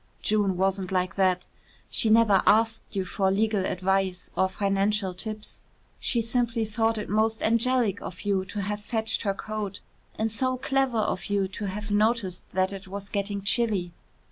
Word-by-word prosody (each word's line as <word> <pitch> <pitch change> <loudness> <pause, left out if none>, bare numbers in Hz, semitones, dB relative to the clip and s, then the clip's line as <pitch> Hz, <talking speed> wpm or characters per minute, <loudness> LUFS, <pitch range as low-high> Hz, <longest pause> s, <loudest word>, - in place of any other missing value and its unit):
June 205 -3 +2
wasn't 190 0 0
like 180 -2 0
that. 185 -1 +2 0.5
She 225 - +1
never 215 -3 +5
asked 225 +1 +4
you 190 -1 0
for 190 +2 0
legal 205 0 +1
advice 190 0 -1
or 190 - +2
financial 195 0 0
tips. 215 +3 -6 0.4
She 235 -2 +1
simply 230 -1 0
thought 225 +1 0
it 210 - -4
most 220 +1 +1
angelic 230 -2 +2
of 180 - -7
you 200 -2 0
to 200 +1 -4
have 210 +1 -3
fetched 220 +1 -1
her 200 -2 -1
coat 210 -2 -4 0.4
and 220 0 0
so 255 +3 0
clever 270 -2 +1
of 210 -3 -1
you 200 -2 +1
to 205 +2 -5
have 205 +2 -4
noticed 210 -3 +1
that 190 +1 +1
it 195 -1 -8
was 200 +1 -7
getting 200 -1 -2
chilly. 200 -4 +2
205 Hz, 170 wpm, -27 LUFS, 190-220 Hz, 0.5 s, never